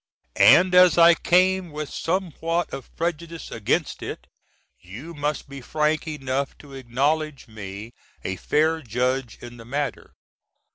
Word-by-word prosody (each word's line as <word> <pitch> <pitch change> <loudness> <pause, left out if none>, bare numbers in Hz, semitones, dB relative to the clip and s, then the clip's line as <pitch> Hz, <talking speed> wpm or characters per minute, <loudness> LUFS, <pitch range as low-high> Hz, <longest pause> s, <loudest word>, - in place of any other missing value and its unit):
And 180 +1 +7
as 180 -1 +7
I 170 0 +8
came 185 +1 +2
with 150 0 -6
somewhat 170 -1 -2
of 135 - -7
prejudice 170 0 -4
against 115 -3 -1
it, - - -6 0.5
you 120 - -10
must 145 -1 -3
be 140 0 -9
frank 155 +4 0
enough 135 -2 -3
to 145 -2 -14
acknowledge 140 +4 -1
me 105 0 -8 0.3
a 95 - -3
fair 160 - +1
judge 125 0 -2
in 120 0 -10
the 115 - -12
matter. 140 +4 -4
150 Hz, 135 wpm, -24 LUFS, 125-165 Hz, 0.5 s, I